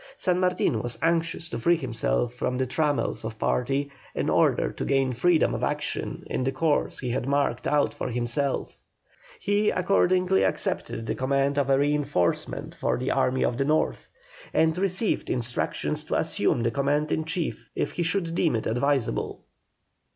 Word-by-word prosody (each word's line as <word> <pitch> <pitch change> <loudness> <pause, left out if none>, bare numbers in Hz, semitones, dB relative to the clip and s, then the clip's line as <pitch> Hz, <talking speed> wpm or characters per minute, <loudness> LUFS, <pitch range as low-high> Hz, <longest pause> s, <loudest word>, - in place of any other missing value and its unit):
San 180 -1 +1
Martin 180 -11 +1
was 120 -1 -3
anxious 165 0 +1
to 115 - -5
free 170 +8 +3
himself 115 - -1
from 125 0 -2
the 130 - +1
trammels 145 +1 0
of 110 0 -5
party 135 +5 0 0.2
in - - 0
order - - +3
to - - -5
gain 135 -2 +1
freedom 160 - +3
of - - -3
action - - -2
in - - -2
the 135 - +1
course 145 +2 0
he 125 -2 -3
had 125 +1 -2
marked 140 -3 0
out 145 0 +2
for - - -4
himself; 125 +3 -2 0.6
he 205 +1 +2
accordingly 180 - +2
accepted 105 +3 -1
the - - -1
command 140 +2 +1
of 140 -1 0
a 135 - +5
reinforcement 145 - 0
for - - -1
the 130 +2 -1
army 130 -1 +2
of 120 - -1
the 135 - +1
North, 155 +2 0 0.5
and 160 0 +3
received 195 +3 -1
instructions 120 -1 -1
to - - -2
assume 115 - +1
the 115 - +1
command 145 +4 0
in 160 - +1
chief 165 0 -3
if - - -1
he - - -3
should 170 0 0
deem 170 -5 +2
it 110 - -2
advisable. 130 +1 0
140 Hz, 170 wpm, -26 LUFS, 125-165 Hz, 0.6 s, a